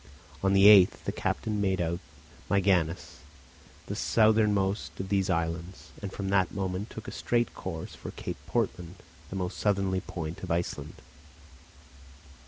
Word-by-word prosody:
On 95 0 +2
the 95 0 +6
8th 100 -3 +7
the - - 0
captain 105 -1 -2
made 95 -1 +1
out 85 0 -1 0.5
Myganness, 95 -4 +1 0.7
the - - -4
southernmost 105 -6 +2
of 95 0 -4
these 95 -2 +1
islands, 85 +1 -3
and 100 -2 -5
from 95 0 -4
that 95 -2 +2
moment 95 +2 -3
took 110 - -9
a - - -5
straight 120 0 0
course 80 -1 -6
for - - -8
Cape - - -6
Portland, 90 0 -2 0.3
the - - -6
most 90 -2 -3
southerly 95 -2 +1
point 80 -1 -6
of 95 - -6
Iceland. 85 +1 -2
95 Hz, 145 wpm, -29 LUFS, 85-100 Hz, 0.7 s, 8th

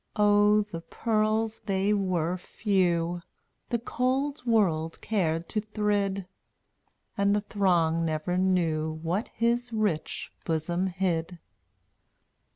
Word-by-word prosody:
Oh, 210 0 +4
the 170 -5 -7
pearls 220 +2 0
they 195 +1 +2
were 180 -4 0
few 175 -3 0 0.5
The 240 - +1
cold 260 +5 -1
world 165 -8 +2
cared 170 -6 -1
to 215 - -1
thrid, 205 -2 -1 0.9
And 200 0 +2
the 210 - +1
throng 175 -6 +1
never 160 +2 -1
knew 170 -4 +1
What 180 +7 -1
his 235 +1 0
rich 210 -8 -2
bosom 170 +3 -1
hid. 175 -2 -1
195 Hz, 105 wpm, -28 LUFS, 170-215 Hz, 0.9 s, Oh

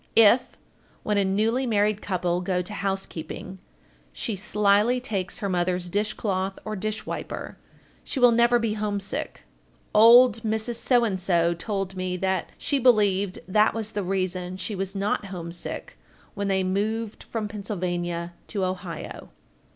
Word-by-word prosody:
If, 230 +3 +5 0.5
when 210 -1 +1
a - - +3
newly 220 +7 +1
married 210 -2 +1
couple 180 -2 -1
go 180 0 0
to 210 - -7
housekeeping, 190 -2 -4 0.5
she 230 -6 -3
slyly 210 +4 +3
takes 200 -7 -3
her 210 -4 -2
mother's 180 -1 -1
dish 205 +2 0
cloth 190 -2 -2
or 215 0 -3
dish 215 +2 -3
wiper, - - -6 0.4
she 275 - -4
will 245 -1 +7
never 235 +1 +4
be 230 -2 0
homesick. 205 -2 -3 0.5
Old 230 +1 +7
Mrs. 215 -6 +1
told 195 -3 -3
me 185 0 -2
that 190 -1 -1
she 280 - 0
believed 205 -6 +3
that 210 +4 +3
was 220 -1 -3
the 205 - -2
reason 185 -1 -2
she 190 +4 -4
was 195 0 -4
not 200 +1 -1
homesick 175 -3 -6 0.3
when 200 -1 -3
they 190 -1 +1
moved 215 +4 -2
from 220 -2 -4
Pennsylvania 175 -4 -3
to 200 -4 -1
Ohio. 185 -2 -6
200 Hz, 140 wpm, -25 LUFS, 185-215 Hz, 0.5 s, will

